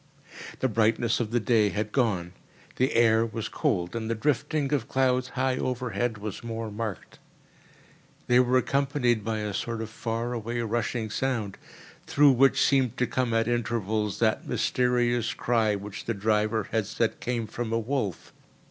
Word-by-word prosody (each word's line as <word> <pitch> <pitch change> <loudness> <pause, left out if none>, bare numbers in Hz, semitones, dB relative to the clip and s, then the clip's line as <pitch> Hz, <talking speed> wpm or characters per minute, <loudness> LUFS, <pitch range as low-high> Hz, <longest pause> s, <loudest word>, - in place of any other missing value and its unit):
The 130 - +3
brightness 115 0 +2
of 115 -3 -1
the 120 +2 +1
day 110 -1 +3
had 105 +1 -3
gone. 100 -9 0 0.4
The 130 +1 +1
air 115 -1 +5
was 115 -1 -4
cold, 90 +2 -1
and 110 -1 -3
the 115 - 0
drifting 145 +3 0
of 130 -6 0
clouds 130 -1 +1
high 130 +1 -1
overhead 125 -2 -2
was 105 +1 -6
more 115 -1 -4
marked. 105 -3 -6 1.1
They 125 0 +4
were 125 0 +4
accompanied 130 -3 +1
by 110 0 -2
a 105 -1 -3
sort 115 +3 -3
of 110 0 -5
far 115 +1 -3
away 120 +1 -3
rushing 115 0 -2
sound, 115 -5 -2 0.5
through 145 -1 +5
which 135 +1 +4
seemed 130 -4 +2
to 125 - +2
come 125 -1 -1
at 115 0 +1
intervals 110 -3 -1
that 110 -1 +1
mysterious 120 0 +1
cry 110 -3 +1
which 100 0 -7
the 115 - -1
driver 105 +1 0
had 110 -3 0
said 110 +1 -1
came 120 -2 -2
from 110 +1 -5
a 115 - +2
wolf. 115 - -3
115 Hz, 165 wpm, -27 LUFS, 110-125 Hz, 1.1 s, air